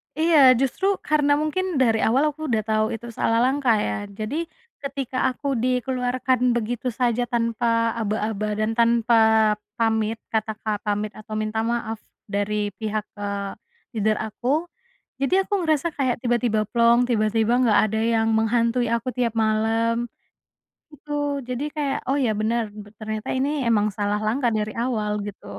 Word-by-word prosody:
Iya 320 +1 +3 0.2
justru 270 +8 -1 0.2
karena 295 -1 +2
mungkin 365 +4 -1
dari 225 -3 +3
awal 250 +7 +3
aku 310 +1 -6
udah 225 -5 +1
tau 215 0 +1
itu 230 +1 -7
salah 230 0 +1
langkah 260 -2 +2
ya 210 - -1 0.2
jadi 295 +11 -2 0.3
ketika 275 -2 -4 0.2
aku 280 - -6
dikeluarkan 250 0 0
begitu 240 +2 -2
saja 245 0 0
tanpa 230 -1 +1
aba-aba 215 -1 -1
dan 215 +1 +1
tanpa, 235 0 +3 0.6
pamit 225 -1 +1
kata-kata 215 -1 -2
pamit 210 0 -1
atau 215 0 -9
minta 215 +1 -2
maaf, 230 -1 -2 0.3
dari 205 +1 -1
pihak, 215 -1 -1 0.2
eee, 200 -1 -3 0.4
leader 215 -1 +1
aku, 255 +9 -1 0.5
jadi 370 +8 +3
aku - - -5
ngerasa 310 0 +2
kayak 260 -3 +1
tiba-tiba 240 -3 +1
plong, 235 +1 +4
tiba-tiba 220 0 +2
nggak 225 -4 +4
ada 220 - -2
yang 225 0 +2
menghantui 235 +2 +1
aku 235 +2 -1
tiap 240 -3 +1
malam. 225 +2 +1 0.9
Gitu 290 -1 -3
jadi 250 +2 -3
kayak, 285 -3 -1
“Oh 275 - +2
ya 250 -5 +2
bener 220 0 0 0.3
ternyata 215 0 -5
ini 270 +2 +1 0.2
emang 215 -2 +3
salah 205 +1 -1
langkah 240 +3 +1
dari 215 0 -2
awal.” 215 -4 -1
Gitu. 205 -1 -9
230 Hz, 145 wpm, -23 LUFS, 215-255 Hz, 0.9 s, plong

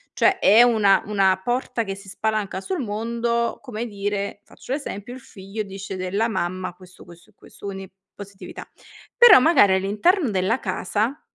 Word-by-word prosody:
Cioè, 380 0 +2
è 220 - +6
una 215 -5 +3
una 190 -3 +2
porta 245 -1 -2
che 195 -2 -5
si 195 0 -14
spalanca 215 -2 -3
sul 370 - -4
mondo, 235 +2 -2
come 240 -4 -6
dire, 200 -1 -4
faccio - - -13
l'esempio, 245 -5 -6
il 260 - -9
figlio 195 +1 -8
dice 195 -1 -8
della 195 +5 -1
mamma 185 -3 -3
questo, 185 0 -17
questo 175 -1 -17
e - - -37
questo, - - -15
quindi 195 -1 -7 0.2
positività; 200 -1 -10 0.5
però, 480 - +9
magari 250 - +5
all'interno 215 - +1
della 195 +6 0
casa 210 +7 -2
205 Hz, 160 wpm, -22 LUFS, 195-235 Hz, 0.5 s, però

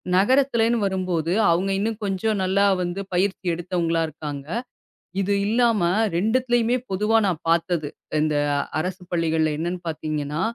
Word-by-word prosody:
நகரத்துலன்னு 235 +2 +3
வரும்போது, 180 -4 -1 0.2
அவுங்க 190 +3 +1
இன்னும் 220 +1 -2
கொஞ்சம் 200 +2 0
நல்லா 195 +2 +2 0.2
வந்து 175 +2 -3
பயிற்சி 190 +1 0
எடுத்தவங்களா 170 -1 -1
இருக்காங்க. 145 -2 -7 0.7
இது 200 +1 0
இல்லாம 230 -2 +2 0.4
2டுத்துலயுமே 240 +3 +2 0.2
பொதுவா 210 +4 +2
நான் 170 -4 -2
பாத்தது. 170 -2 +1 0.3
இந்த 155 -1 +1 0.4
அரசுப் 180 +1 -5
பள்ளிகள்ல 160 -2 +1
என்னன்னு 175 +2 -3
பாத்தீங்கன்னா? 150 0 -3
185 Hz, 120 wpm, -23 LUFS, 165-210 Hz, 0.7 s, நகரத்துலன்னு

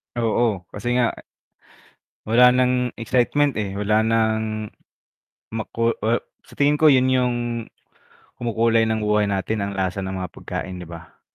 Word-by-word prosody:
Oo, 115 -4 0
kasi 120 +4 -2
nga 125 -2 +2 1.1
Wala 120 +3 +6
ng 125 -1 +1
excitement, 130 +5 +1
eh, 100 -1 -3
wala 105 +1 +2
ng, 110 -1 0 0.8
maku 115 +1 -1
ah 115 +2 +2 0.2
sa - - -18
tingin 145 +1 +4
ko 155 0 +5
'yun 130 -1 +4
yung, 125 -1 +2 1.1
kumukulay 115 -1 +2
ng 110 -1 -1
buhay 105 0 +2
natin, 100 +2 -1
ang 100 0 -4
lasa 95 0 -1
ng 95 0 -4
mga 90 -2 -5
pagkain, 95 -1 -6
'di 90 - -9
ba? 85 -1 -12
110 Hz, 145 wpm, -22 LUFS, 105-125 Hz, 1.1 s, Wala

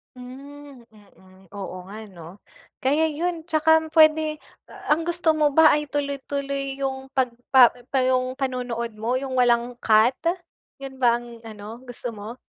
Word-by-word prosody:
Hmm 275 +1 -12
mm, 190 -3 -21
oo 195 -2 -6
nga 215 +3 -9
no? 175 +2 -13 0.4
Kaya 295 +5 +2
yun. 325 +2 -3
Tsaka 320 0 +4
m 320 - -8
pwede 310 -1 +4 0.3
a - - -7
ang 325 +2 +1
gusto 345 -1 +2
mo 310 -1 +2
ba 320 -1 +7
ay 300 0 0
tuloy-tuloy 280 -1 -3
yung 265 0 -3
pagpa 250 -1 +4 0.2
pa 270 - 0
yung 255 0 0
panonood 250 -3 -3
mo 230 +3 -1
yung 260 -1 -2
walang 240 0 +2
cut? 220 +3 +3 0.6
Yun 265 -1 -9
ba 240 -2 +4
ang 240 -1 -9
ano 215 +1 -9
gusto 245 0 -5
mo? 215 +2 -9
260 Hz, 155 wpm, -23 LUFS, 235-290 Hz, 0.6 s, ba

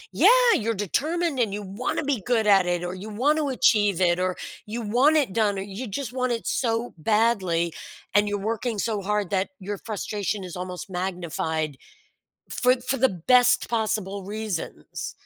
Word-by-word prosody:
Yeah! - - +5 0.3
You're 225 0 0
determined 295 - -1
and 225 -4 +1
you 205 +1 -4
wanna 200 +10 -3
be 275 -7 -1
good 230 0 +1
at 195 -3 +5
it, 175 0 0
or 175 +1 -3
you 195 +4 -8
want 285 +9 +1
to 290 -2 0
achieve 205 -7 +3
it, 175 -1 +3
or 185 0 0 0.3
you 230 +3 -4
want 255 +9 +4
it 265 -10 +1
done, 210 -2 +1
or 195 - -3
you 205 +6 -6
just 245 +4 -4
want 255 -1 0
it 230 - -2
so 230 -1 -1
badly 190 -5 +1 0.4
and 205 0 +4
you're 205 - -1
working 225 +2 -2
so 210 0 -1
hard 205 -1 -1
that 190 0 0
your 200 +1 -5
frustration 210 -1 -3
is 180 -3 -7
almost 180 0 -6
magnified 170 -5 -3 0.7
for 250 +1 +2
for 255 +2 -1
the 265 +1 +4
best 245 +7 +3
possible 210 -4 -1
reasons. 205 -2 -5
210 Hz, 175 wpm, -25 LUFS, 190-240 Hz, 0.7 s, Yeah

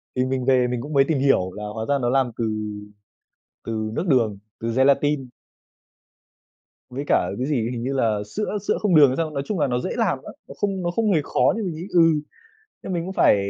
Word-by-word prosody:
Thì 125 - +1
mình 130 -1 -2
về 130 -1 +3
mình 125 -1 -2
cũng 150 +3 -7
mới 135 -1 +5
tìm 155 -4 +1
hiểu 130 -9 +2
là 105 - -7
hóa 110 -1 -4
ra 140 - +3
nó 120 - +1
làm 130 -1 +2
từ - - -1 1.2
từ 110 -1 -3
nước 180 - -2
đường, 115 - +2 0.2
từ 115 0 -2
gelatin. 135 0 +2 1.6
Với 130 +3 -5
cả 90 - +2
cái 130 - -1
gì, 120 -6 0
hình 120 -1 -4
như 135 - -2
là 115 -6 +1 0.2
sữa 210 0 -1
sữa - - +2
không 200 -5 +2
đường 150 -2 +8
hay 130 - -2
sao. 165 -1 0
Nói 140 -2 -3
chung 205 -5 -2
là 145 - +2
nó 125 -1 0
dễ 185 - -3
làm 200 - 0
lắm, - - -9
nó - - -9
không 195 +1 -1
nó 175 - 0
không 215 +3 +1
hề 160 - +3
khó - - +2
nhưng 220 -2 -3
mình 175 -4 -3
nghĩ, 170 +4 -7
ừ, 180 - +3 0.8
thế - - -6
mình 170 -2 -1
cũng 190 - -5
phải 175 - +4
135 Hz, 235 wpm, -23 LUFS, 125-165 Hz, 1.6 s, đường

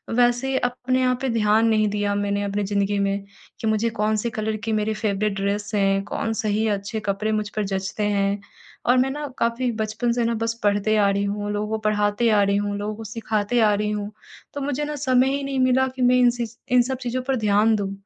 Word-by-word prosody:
वैसे 245 +2 +2
अपने 255 +1 0
आप 250 -1 +1
पे 265 - 0
ध्यान 220 -1 +3
नहीं 215 -1 +3
दिया 205 0 -1
मैंने 205 0 -1
अपनी 200 +1 -1
ज़िंदगी 200 0 0
में 200 0 0 0.4
कि 225 - -2
मुझे 220 +1 +1
कौन-से 215 +2 +1
कलर 220 -1 -2
की 225 - -1
मेरी 215 0 0
फ़ेवरेट 210 -1 -1
ड्रेस 205 +2 -2
है 195 -1 +2
कौन 225 - -2
सही 220 0 0
अच्छे 205 +1 -2
कपड़े 210 +1 -1
मुझ 215 -1 -1
पर 215 - 0
जचते 195 +2 -3
हैं 200 +1 +1 0.5
और 250 +1 +4
मैं 260 +1 +3
ना 295 +1 -4
काफ़ी 235 +1 0
बचपन 220 +2 -1
से 240 0 0
ना 235 - +1
बस 230 +1 -1
पढ़ते 205 +1 +2
आ 200 -1 +4
रही 200 0 0
हूँ 205 +1 -2
लोगों 210 0 -2
को 220 - -1
पढ़ाते 210 +2 +1
आ 210 -2 +4
रही 200 0 +2
हूँ 205 0 -1
लोगों 210 +1 -3
को 225 - -8
सिखाते 220 +1 -1
आ 210 -1 +4
रही 210 +1 0
हूँ 210 0 -3 0.4
तो 285 - -4
मुझे 285 +1 -2
ना 300 0 -4
समय 260 -2 +2
ही 280 - -3
नहीं 275 -1 -2
मिला 260 +1 +3
कि 260 - -5
मैं 250 0 +5
इन 245 -1 +6
सि 235 - -1 0.3
इन 245 - +7
सब 260 +2 -3
चीज़ों 250 +1 -2
पर 270 - +2
ध्यान 215 -1 +3
दूँ। 200 -2 -2
215 Hz, 230 wpm, -23 LUFS, 205-245 Hz, 0.5 s, इन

